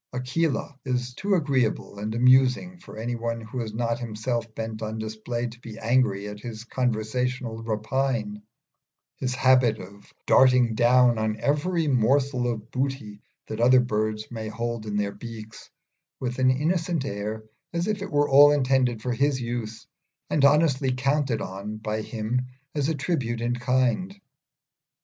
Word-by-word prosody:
Aquila 135 Hz, +2 st, -1 dB
is 125 Hz, -1 st, -2 dB
too 200 Hz, +8 st, 0 dB
agreeable 130 Hz, -, 0 dB
and 110 Hz, +2 st, -3 dB
amusing 130 Hz, +8 st, +4 dB
for 170 Hz, -, -12 dB
any 115 Hz, +2 st, -3 dB
one 115 Hz, 0 st, -3 dB
who 115 Hz, +2 st, -5 dB
is 110 Hz, -2 st, -4 dB
not 115 Hz, +1 st, -1 dB
himself 115 Hz, 0 st, -3 dB
bent 110 Hz, -1 st, -5 dB
on 110 Hz, 0 st, -4 dB
display 110 Hz, +2 st, -4 dB
to 120 Hz, 0 st, -8 dB
be 115 Hz, -3 st, -10 dB
angry 110 Hz, -4 st, +1 dB
at 105 Hz, 0 st, -7 dB
his 115 Hz, 0 st, -7 dB
conversational 125 Hz, 0 st, -2 dB
rapine 110 Hz, -1 st, -2 dB, 0.8 s
his 130 Hz, -1 st, -2 dB
habit 130 Hz, -4 st, +4 dB
of 100 Hz, +1 st, -13 dB
darting 125 Hz, -3 st, +5 dB
down 120 Hz, 0 st, +4 dB
on 110 Hz, 0 st, -1 dB
every 160 Hz, +3 st, 0 dB
morsel 130 Hz, 0 st, +2 dB
of 110 Hz, -1 st, -7 dB
booty 130 Hz, -6 st, -3 dB, 0.2 s
that 110 Hz, -, -6 dB
other 125 Hz, +2 st, +6 dB
birds 110 Hz, -2 st, -1 dB
may 110 Hz, -2 st, -5 dB
hold 115 Hz, 0 st, -4 dB
in 105 Hz, -1 st, -2 dB
their 100 Hz, -1 st, 0 dB
beaks, 110 Hz, 0 st, -10 dB, 0.5 s
with 125 Hz, 0 st, -3 dB
an 130 Hz, 0 st, +4 dB
innocent 160 Hz, +2 st, 0 dB
air, 105 Hz, -1 st, -4 dB, 0.3 s
as 170 Hz, 0 st, -1 dB
if 210 Hz, -1 st, -2 dB
it 200 Hz, -, -4 dB
were 145 Hz, -1 st, +3 dB
all 145 Hz, +2 st, +8 dB
intended 130 Hz, -5 st, +1 dB
for 125 Hz, -, -1 dB
his 140 Hz, +2 st, +1 dB
use, 115 Hz, -2 st, -5 dB, 0.5 s
and 145 Hz, -, +2 dB
honestly 140 Hz, -2 st, +4 dB
counted 135 Hz, -2 st, 0 dB
on 100 Hz, +3 st, -6 dB
by 110 Hz, 0 st, -3 dB
him 115 Hz, +3 st, -2 dB, 0.3 s
as 145 Hz, -1 st, 0 dB
a 160 Hz, -, 0 dB
tribute 130 Hz, -6 st, -2 dB
in 120 Hz, +1 st, -1 dB
kind. 130 Hz, -, 0 dB
120 Hz, 155 wpm, -25 LUFS, 110-135 Hz, 0.8 s, all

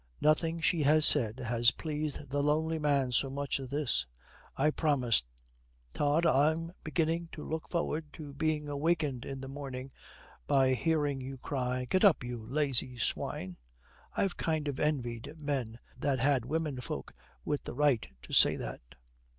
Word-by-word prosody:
Nothing 165 Hz, +2 st, +2 dB
she 165 Hz, -1 st, +2 dB
has 155 Hz, +2 st, +5 dB
said 115 Hz, -6 st, +4 dB
has 120 Hz, 0 st, +3 dB
pleased 150 Hz, -1 st, -4 dB
the 145 Hz, +1 st, +1 dB
lonely 160 Hz, +2 st, +1 dB
man 140 Hz, -4 st, +1 dB
so 135 Hz, +3 st, +1 dB
much 140 Hz, +1 st, -2 dB
as 135 Hz, -, -6 dB
this. 130 Hz, -, 0 dB, 0.5 s
'I 150 Hz, +3 st, +3 dB
promise. 130 Hz, -, +2 dB, 0.7 s
Tod, 150 Hz, +3 st, +2 dB
I'm 160 Hz, +3 st, +3 dB
beginning 165 Hz, +1 st, 0 dB
to 150 Hz, -, -7 dB
look 160 Hz, 0 st, -4 dB
forward 160 Hz, -3 st, -2 dB
to 145 Hz, -3 st, -9 dB
being 150 Hz, +1 st, 0 dB
wakened 150 Hz, -6 st, 0 dB
in 135 Hz, -1 st, -6 dB
the 135 Hz, -, -6 dB
morning 135 Hz, -1 st, -6 dB, 0.6 s
by 135 Hz, -1 st, +4 dB
hearing 145 Hz, -1 st, 0 dB
you 135 Hz, +1 st, -6 dB
cry, 125 Hz, -1 st, -2 dB
"Get 185 Hz, -, +2 dB
up, 190 Hz, -10 st, +5 dB
you 120 Hz, -2 st, -5 dB
lazy 130 Hz, 0 st, 0 dB
swine." 90 Hz, -5 st, -2 dB, 0.6 s
I've 195 Hz, -3 st, 0 dB
kind 155 Hz, -2 st, -1 dB
of 140 Hz, -2 st, -3 dB
envied 135 Hz, -1 st, -2 dB
men 135 Hz, -6 st, -2 dB, 0.2 s
that 135 Hz, 0 st, +1 dB
had 130 Hz, -1 st, +2 dB
womenfolk 135 Hz, -, -3 dB, 0.3 s
with 145 Hz, -1 st, -2 dB
the -, -, -5 dB
right 145 Hz, -5 st, +2 dB, 0.2 s
to -, -, -10 dB
say -, -, +7 dB
that.' -, -, -6 dB
145 Hz, 155 wpm, -31 LUFS, 130-155 Hz, 0.7 s, say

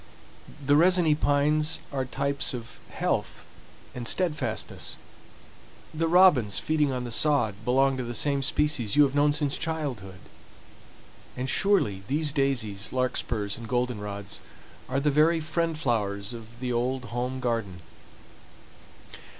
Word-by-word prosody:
The 145 Hz, +1 st, +4 dB
resiny 175 Hz, 0 st, +5 dB
pines 150 Hz, +1 st, +2 dB
are 135 Hz, -1 st, -1 dB
types 140 Hz, +2 st, -1 dB
of 120 Hz, 0 st, -9 dB
health -, -, -2 dB, 0.5 s
and 120 Hz, -2 st, -5 dB
steadfastness; 150 Hz, -11 st, -1 dB, 1.0 s
the 165 Hz, +1 st, 0 dB
robins 160 Hz, -, +5 dB
feeding 150 Hz, -3 st, +1 dB
on 125 Hz, -1 st, -3 dB
the 120 Hz, -, -5 dB
sod 140 Hz, -4 st, +2 dB
belong 135 Hz, +3 st, +2 dB
to 130 Hz, -, -3 dB
the 120 Hz, 0 st, -5 dB
same 140 Hz, +4 st, +2 dB
species 140 Hz, -5 st, +1 dB
you 150 Hz, -, +7 dB
have 135 Hz, -2 st, +1 dB
known 145 Hz, +1 st, +3 dB
since 145 Hz, -1 st, 0 dB
childhood; 135 Hz, -, -4 dB, 1.2 s
and 130 Hz, +1 st, -2 dB
surely 150 Hz, -, +2 dB
these 150 Hz, +1 st, -1 dB
daisies, 120 Hz, -8 st, -1 dB
larkspurs, 120 Hz, -5 st, -1 dB
and 115 Hz, -, -8 dB
goldenrods 105 Hz, -5 st, -3 dB, 0.5 s
are 130 Hz, +1 st, 0 dB
the 145 Hz, +1 st, +1 dB
very 160 Hz, +3 st, +4 dB
friend 160 Hz, +1 st, -1 dB
flowers 105 Hz, -7 st, -1 dB
of 115 Hz, +1 st, -11 dB
the 125 Hz, -1 st, -2 dB
old 125 Hz, +2 st, -1 dB
home 125 Hz, +2 st, -2 dB
garden. 115 Hz, -8 st, -2 dB
130 Hz, 130 wpm, -27 LUFS, 120-150 Hz, 1.2 s, you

